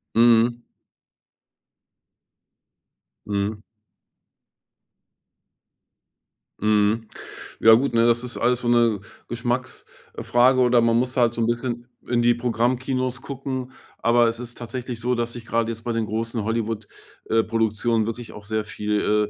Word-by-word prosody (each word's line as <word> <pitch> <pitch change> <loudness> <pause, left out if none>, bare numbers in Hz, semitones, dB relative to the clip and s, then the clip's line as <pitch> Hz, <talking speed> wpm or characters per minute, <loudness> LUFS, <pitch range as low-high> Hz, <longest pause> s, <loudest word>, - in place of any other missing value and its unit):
Mhm. 120 +1 +4 2.6
Mhm. 105 +1 -2 3.0
Mhm. 105 +1 +2 0.5
Ja 115 - +7
gut, 120 +3 +3
ne, 115 0 +4
das 120 +1 +2
ist 125 -1 -6
alles 125 +1 +1
so 120 - -3
'ne 120 -4 +3 0.3
Geschmacks 120 +2 -3 0.3
äh, - - -4
Frage 125 +2 +4
oder 125 -1 +4
man 115 0 +3
muss 125 +1 -1
halt 120 -2 +3
so 120 - -2
'n 115 - +2
bisschen 120 0 -2 0.2
in 120 -1 +1
die 120 0 +4
Programmkinos 125 +2 -1
gucken. 130 -1 -5 0.3
Aber 120 0 +4
es 115 0 -2
ist 120 -1 -8
tatsächlich 120 0 -6
so, 125 +1 0
dass 120 0 -2
sich 120 -2 -9
gerade 115 0 0
jetzt 115 0 -8
bei 120 - -2
den 115 -1 0
großen 115 +1 -3
Hollywood 110 -1 -2 0.4
äh, 115 0 +4
Produktionen 115 0 0
wirklich 115 +1 -6
auch 105 - -11
sehr 110 +1 -2
viel, 105 0 0
115 Hz, 135 wpm, -23 LUFS, 110-120 Hz, 3.0 s, Ja